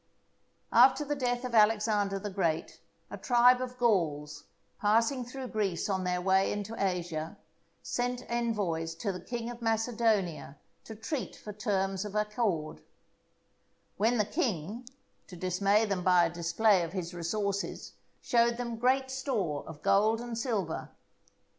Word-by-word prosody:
After 295 - +6
the 290 - -1
death 245 -2 -1
of 250 - -5
Alexander 210 -2 +3
the 205 +1 -5
Great 170 -5 -1 0.3
a - - -7
tribe 245 0 +5
of 250 0 -5
Gauls, 150 -11 0 0.3
passing 230 +5 +2
through 255 +1 -7
Greece 200 -6 -1
on 190 -1 -1
their 180 0 0
way 190 +1 +2
into 205 +2 -4
Asia, 175 -3 -2 0.5
sent 245 0 -2
envoys 200 -9 -1
to 200 +4 -2
the 180 - -6
King 235 -1 -4
of 240 0 -10
Macedonia 220 - 0 0.3
to 220 - -8
treat 240 +5 -4
for 210 - -9
terms 195 -2 -1
of 210 0 -7
accord; 210 -7 -1 1.2
when 225 +4 +2
the 210 - +2
king, 230 - -3 0.4
to 180 - -10
dismay 195 +4 +2
them 195 -4 -2
by 180 -1 +5
a 165 - -2
display 175 +4 +3
of 170 0 -4
his 180 -2 -4
resources, 200 +3 -3 0.3
showed 235 0 +2
them 235 -2 -4
great 260 +3 +1
store 220 - -2
of 155 -2 -10
gold 215 +3 +3
and 240 -1 -5
silver. 220 -8 -2
210 Hz, 145 wpm, -30 LUFS, 180-235 Hz, 1.2 s, After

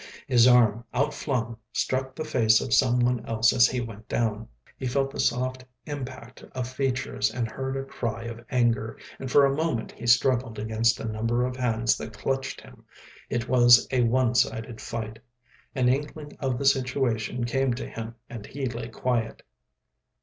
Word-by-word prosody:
His 120 -1 +5
arm, 120 -3 +5
outflung, 125 -4 -1
struck 130 0 -1
the 155 - -4
face 115 -7 +4
of 130 - -2
someone 125 -2 +3
else 115 0 +3
as 115 - +6
he 125 0 -2
went 110 -2 -8
down; 110 -1 -1 0.3
he 130 - -4
felt 135 +2 0
the - - -8
soft 130 +1 0 0.2
impact 130 -4 -7
of 125 -2 -2
features 130 -4 -1
and 120 -1 -2
heard 130 +4 -4
a 135 - -3
cry 115 -4 -4
of 115 0 -7
anger, 115 -3 +1 0.2
and 135 - -5
for 140 +2 +6
a 135 0 +1
moment 155 -7 -1
he 120 - -8
struggled 125 -1 +3
against 110 +2 +1
a - - -5
number 115 +3 0
of 125 0 -3
hands 115 -2 +1
that 110 -1 -8
clutched 135 0 -2
him. - - -16 0.5
It 120 0 -2
was 120 -1 +6
a 130 -2 +2
one 120 +1 +2
sided 115 -1 0
fight. 110 -1 -5 0.6
An 130 -2 +2
inkling 145 +3 -2
of 130 -3 -1
the 140 - -3
situation 125 -3 +1
came 130 +1 0
to 125 - -5
him 115 +1 -7
and 115 -3 -8
he 135 0 -4
lay 120 -2 -4
quiet. 120 -2 -2
120 Hz, 170 wpm, -26 LUFS, 115-130 Hz, 0.6 s, as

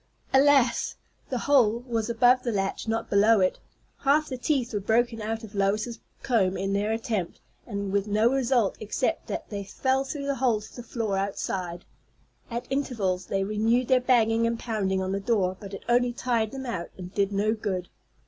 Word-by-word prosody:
Alas! 270 -3 +4 0.3
the 255 - -1
hole 240 -4 +3
was 230 -2 -2
above 245 +2 +4
the 240 - -2
latch, 195 +1 -2
not 225 0 -1
below 210 +2 +4
it. 185 -1 +1 0.4
Half 295 +2 +2
the 260 - -3
teeth 250 -2 0
were 205 - 0
broken 225 +2 +1
out 220 +2 -3
of 220 -1 -10
Lois's 210 +4 0 0.2
comb 195 -7 +2
in 195 +1 -1
their 205 +2 0
attempt, 220 -5 -2 0.3
and 200 -3 -3
with 200 +1 0
no 215 +2 +3
result 250 -5 +2
except 215 - -2
that - - -5
they 200 -1 -3
fell 265 +6 0
through 280 +1 -5
the 280 - 0
hole 240 -5 +3
to 215 - -13
the 245 - -7
floor 225 -4 -2
outside. 185 -3 -3 0.6
At 235 0 -4
intervals 205 -10 -1
they 195 0 0
renewed 225 +4 +1
their 255 -1 +5
banging 230 -2 +3
and 230 0 -1
pounding 195 -5 -1
on 190 - -2
the 195 - -1
door, 195 -3 +1
but 200 -2 -9
it 195 - -8
only 240 0 +3
tired 235 -3 0
them 270 +1 -7
out, 205 -9 -4
and 185 0 -8
did 200 -1 +1
no 205 +2 +1
good. 190 -5 -3
225 Hz, 190 wpm, -26 LUFS, 200-245 Hz, 0.6 s, their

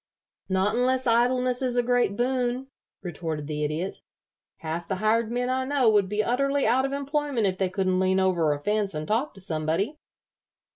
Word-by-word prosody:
"Not 190 +2 +1
unless 255 +1 +1
idleness 250 +2 +2
is 250 -2 0
a 245 - +3
great 245 -4 +1
boon," 250 +1 -1 0.3
retorted 160 -3 -4
the 150 0 -3
Idiot. 155 +6 -3 0.6
"Half 165 +1 -5
the 190 - -1
hired 220 +3 +1
men 245 +1 -1
I 260 +1 0
know 260 -4 +3
would 205 -3 +2
be 210 +1 0
utterly 275 +4 +1
out 255 +4 +3
of 270 - -3
employment 280 -4 -1
if 185 -1 -1
they 190 -1 +1
couldn't 185 -1 0
lean 190 0 +2
over 175 -5 +2
a 145 - -1
fence 210 -3 0
and 155 0 -4
talk 230 +6 -1
to 195 - -12
somebody. 170 - -2
215 Hz, 185 wpm, -26 LUFS, 185-255 Hz, 0.6 s, a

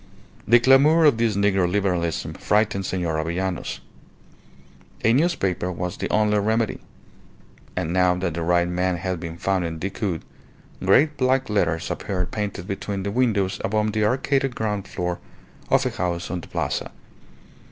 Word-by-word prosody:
The 120 +2 +7
clamour 140 +6 +5
of 140 -7 +4
this 115 -3 +1
Negro 100 -3 +2
Liberalism 90 -5 -1
frightened 105 -2 0
Senor 85 -4 -1
Avellanos. 90 +3 -3 1.2
A 115 - +4
newspaper 110 - +1
was 90 0 -4
the - - -3
only 105 -1 +2
remedy. 110 +2 0 1.0
And 85 -2 -2
now 90 -1 +3
that 90 -2 -2
the 85 - -3
right 85 +1 +2
man 90 0 0
had 95 -1 -3
been 85 -1 -6
found 95 0 0
in 80 -1 -4
Decoud, 95 -1 -3 0.6
great 145 +11 +4
black 130 -2 +1
letters 85 -6 0
appeared 90 -2 -3
painted 105 -4 -4
between 100 0 -4
the 100 - -2
windows 105 -5 +1
above 105 +1 0
the 110 -1 +1
arcaded 135 +3 +1
ground 105 -3 -2
floor 90 0 -3 0.5
of - - +3
a - - 0
house 85 -1 -3
on 90 -1 -3
the - - -12
Plaza. - - -2
95 Hz, 150 wpm, -23 LUFS, 90-110 Hz, 1.2 s, The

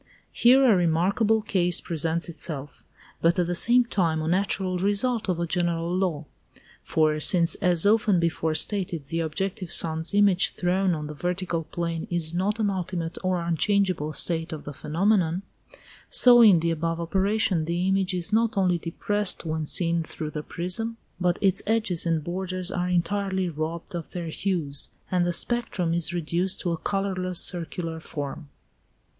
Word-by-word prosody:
Here 260 +3 +4
a 230 -5 +5
remarkable 190 +6 +1
case 180 -4 +2
presents 165 +1 -1
itself, 155 -4 -3 0.4
but 170 +1 +2
at 180 - +2
the 175 - -2
same 240 +7 +4
time 170 -8 0
a - - -3
natural 185 0 0
result 205 +3 0
of 175 -2 -1
a 170 - -1
general 170 0 -1
law. 175 -5 -1 0.6
For 155 -1 0
since, 170 +2 +3
as 175 -1 +2
often 205 -3 +3
before 165 -1 -1
stated, 175 -2 +1
the 165 +4 -4
objective 185 +4 -3
sun's 160 +3 +4
image 200 -3 +3
thrown 180 0 0
on 150 -1 -5
the 150 - -7
vertical 175 +1 -3
plane 165 0 -4
is 170 -2 -1
not 200 +5 -1
an 205 -2 +1
ultimate 180 -3 -4
or 185 -2 -1
unchangeable 170 -1 0
state 165 +1 +1
of 155 -2 -7
the 145 - -8
phenomenon, 175 +4 0 0.7
so 245 -1 +7
in 200 -8 +6
the 165 0 0
above 165 +1 -2
operation 190 0 0
the 175 +3 -1
image 190 -1 0
is 180 +3 -2
not 225 -1 +1
only 180 -3 +2
depressed 205 +4 -2
when 155 -1 -3
seen 170 0 +2
through 155 -1 -6
the 150 - -5
prism, 205 +9 -2 0.2
but 180 -1 +1
its 195 -3 +2
edges 215 -7 0
and 165 -2 0
borders 185 +1 -4
are 180 0 -2
entirely 190 +1 -1
robbed 160 +2 -5
of 170 -2 -7
their 170 -2 -5
hues, 160 -6 -1 0.2
and 180 -1 +1
the - - +1
spectrum 190 -5 -1
is 170 -1 +2
reduced 175 +3 -2
to 175 - -2
a 165 - -2
colourless 185 0 -2
circular 165 -1 +1
form. 145 -2 -7
175 Hz, 165 wpm, -25 LUFS, 165-195 Hz, 0.7 s, so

